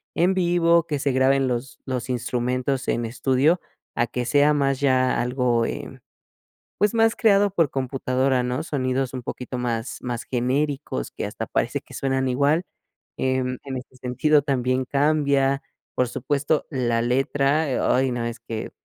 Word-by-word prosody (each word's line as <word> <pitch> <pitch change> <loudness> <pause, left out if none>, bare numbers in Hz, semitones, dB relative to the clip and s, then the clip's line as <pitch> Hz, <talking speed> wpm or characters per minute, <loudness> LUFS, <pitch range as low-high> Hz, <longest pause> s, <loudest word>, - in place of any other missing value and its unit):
en 180 +3 +3
vivo, 170 -2 +3
que 150 - -1
se 140 0 +1
graben 130 +1 +3
los 125 0 -3
los 125 -2 -3
instrumentos 125 +2 -1
en 120 - 0
estudio, 130 +8 +2 0.3
a 120 - +1
que 125 +1 -3
sea 145 +4 +4
más 135 -2 +1
ya 130 -2 +2
algo, 125 -2 +1
eh, - - -7 0.8
pues, 210 +2 +2
más 225 0 +4
creado 205 -3 +4
por 165 -6 +2
computadora, 130 0 0
¿no? 125 +4 -2
sonidos 130 -4 -1
un 130 - -4
poquito 125 +1 -5
más 115 0 -3
más 120 -2 -4
genéricos 130 - -1
que - - -4
hasta - - -5
parece - - -1
que - - -16
suenan 135 -1 0
igual. 145 +7 +2 0.5
Em, 130 -1 -1
en 135 -2 -4
este 130 0 -11
sentido 145 +4 +2
también 130 -2 0
cambia, 140 -1 +2 0.3
por 125 - +2
supuesto, 145 +4 0
la 120 -4 0
letra. 140 +4 +1
Eh, - - 0
ay, 130 0 +2
no, 120 -1 -2
es 115 0 -5
que, 110 -1 -6
130 Hz, 160 wpm, -23 LUFS, 125-145 Hz, 0.8 s, sea